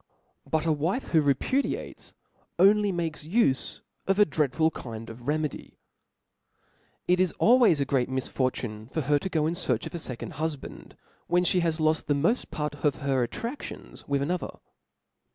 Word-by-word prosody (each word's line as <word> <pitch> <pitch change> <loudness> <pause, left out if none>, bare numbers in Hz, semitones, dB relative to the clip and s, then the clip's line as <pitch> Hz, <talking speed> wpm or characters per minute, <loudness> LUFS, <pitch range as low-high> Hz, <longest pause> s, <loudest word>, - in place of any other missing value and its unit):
But 160 0 0
a 165 - +3
wife 165 - -1
who 160 - +4
repudiates, 145 - -1 0.4
only 205 +3 +5
inakes 165 -3 -4
ufe 170 - +1 0.3
of 195 0 +2
a 210 - +7
dreadful 155 +1 +1
kind 115 -4 -7
of 120 +3 -12
remedy. 150 -1 -2 1.3
It 180 0 +3
is 185 -4 +2
always 235 - +5
a 140 - +1
great 130 -2 0
misfortune 125 -4 -2
for 160 +5 -2
her 145 +1 +2
to 190 - -4
go 155 -4 +1
in 160 - 0
iearch 150 -10 -1
of - - -7
a 170 - -4
fecond 125 -6 -6
hufband, 155 -2 -5 0.3
when 175 +1 +3
(he 180 +1 +2
has 165 -2 0
loft 155 0 +1
the 145 - +2
moft 170 - +1
part 150 -1 -3
of 145 -3 +3
her 130 -3 +2
attradlions 240 - -7
with 140 -1 +1
another. 175 +4 -3
155 Hz, 165 wpm, -27 LUFS, 135-175 Hz, 1.3 s, a